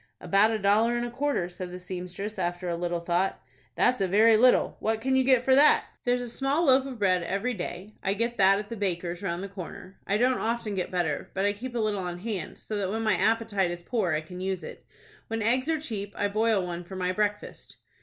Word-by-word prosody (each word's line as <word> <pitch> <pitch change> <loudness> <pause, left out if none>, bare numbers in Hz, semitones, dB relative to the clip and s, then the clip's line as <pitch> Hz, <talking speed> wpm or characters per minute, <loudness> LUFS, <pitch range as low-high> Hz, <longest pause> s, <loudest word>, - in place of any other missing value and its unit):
"About 200 +2 +3
a 225 - 0
dollar 215 +4 +3
and 240 - -1
a 240 - -5
quarter," 275 -7 -1
said 180 0 -7
the 180 - -7
seamstress, 180 +3 -6
after 175 +1 -2
a 170 - -1
little 175 0 -2
thought. 175 +3 0 0.4
"That's 250 -4 +2
a 190 - +2
very 220 +4 +5
little. 245 +3 +4
What 220 0 0
can 265 +3 0
you 260 - +4
get 255 -2 +3
for 265 - +5
that?" 285 +3 +6 0.2
"There's 245 0 +2
a 245 - -4
small 270 +7 0
loaf 265 -1 +4
of 260 -3 -7
bread 185 -4 +2
every 200 +8 -2
day. 185 +1 -6
I 195 +1 0
get 235 +2 -2
that 195 0 +6
at 205 0 -6
the 230 - -5
baker's 175 -4 -3
round 180 -2 -3
the - - -4
corner. 190 0 -9
I 200 - +2
don't 250 +3 +2
often 230 -1 -2
get 185 -2 -2
butter, 175 -5 -2
but 195 +1 +1
I 205 - +2
keep 245 +4 -7
a - - 0
little 215 -3 0
on 180 -1 -4
hand, 195 -3 -5
so 215 - -5
that 195 -2 -1
when 220 +3 -2
my 215 -2 +3
appetite 220 -3 +1
is 175 0 -6
poor 195 -6 0
I 155 - 0
can 180 +3 -9
use 190 -1 -2
it. - - -10 0.4
When 225 -1 -2
eggs 255 +6 +1
are 320 -1 +1
cheap, 205 -8 -6
I 205 - +1
boil 215 -2 +1
one 175 0 -5
for 190 +2 -10
my 180 -1 -1
breakfast." 210 +1 -3
205 Hz, 245 wpm, -27 LUFS, 180-230 Hz, 0.4 s, that